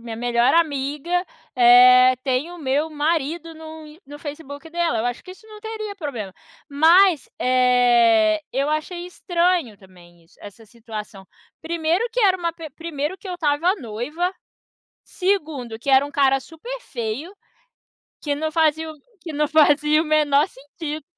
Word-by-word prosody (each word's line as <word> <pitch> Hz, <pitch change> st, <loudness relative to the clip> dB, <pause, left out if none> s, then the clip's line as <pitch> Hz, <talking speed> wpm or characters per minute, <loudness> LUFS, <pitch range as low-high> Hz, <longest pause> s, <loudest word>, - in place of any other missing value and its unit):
a 230 Hz, -, -18 dB
minha 225 Hz, -1 st, -6 dB
melhor 240 Hz, +2 st, +1 dB
amiga, 295 Hz, -1 st, -1 dB, 0.4 s
eh, 250 Hz, +1 st, +7 dB
tem 265 Hz, +4 st, -1 dB
o 355 Hz, -, -10 dB
meu 290 Hz, +1 st, -1 dB
marido 320 Hz, +2 st, -2 dB
no 315 Hz, 0 st, -11 dB
Ins 305 Hz, +3 st, -16 dB
no 290 Hz, +1 st, -10 dB
Facebook 290 Hz, +1 st, -9 dB
dela. 340 Hz, -8 st, -1 dB
Eu 220 Hz, -, -2 dB
acho 245 Hz, -1 st, -4 dB
que 370 Hz, -, -12 dB
isso 435 Hz, +4 st, -19 dB
não 425 Hz, -1 st, -13 dB
teria 435 Hz, -1 st, -6 dB
problema. 260 Hz, -, -6 dB, 0.4 s
Mas, 325 Hz, +1 st, +4 dB
eh, 240 Hz, -4 st, +3 dB
eu 275 Hz, +3 st, -1 dB
achei 345 Hz, +3 st, -3 dB
estranho 350 Hz, -, -1 dB
também 175 Hz, -3 st, -20 dB
isso 165 Hz, -, -27 dB
essa 205 Hz, +2 st, -12 dB
situação. 215 Hz, -3 st, -10 dB, 0.3 s
Primeiro 330 Hz, +3 st, -1 dB
que -, -, -1 dB
era 385 Hz, -4 st, +4 dB
uma 340 Hz, -2 st, -3 dB
pe 325 Hz, -2 st, -9 dB
primeiro 310 Hz, +3 st, -5 dB
que 390 Hz, -, -11 dB
eu 365 Hz, -, -4 dB
estava 330 Hz, +2 st, +1 dB
noiva, 295 Hz, -, -4 dB, 0.7 s
segundo 305 Hz, -, -2 dB
que 275 Hz, -, -3 dB
era 265 Hz, +1 st, +5 dB
um -, -, -10 dB
cara 270 Hz, -1 st, +2 dB
super 470 Hz, -, -9 dB
feio, 245 Hz, -, -5 dB, 0.9 s
que 290 Hz, -, -2 dB
não 315 Hz, +2 st, -2 dB
fazia 320 Hz, 0 st, +1 dB
o 310 Hz, -, -10 dB, 0.2 s
que 325 Hz, -1 st, -8 dB
não 300 Hz, +1 st, 0 dB
fazia 300 Hz, 0 st, +4 dB
o -, -, -4 dB
menor 300 Hz, -2 st, +2 dB
sentido. 295 Hz, +3 st, -8 dB
295 Hz, 160 wpm, -22 LUFS, 250-330 Hz, 0.9 s, eh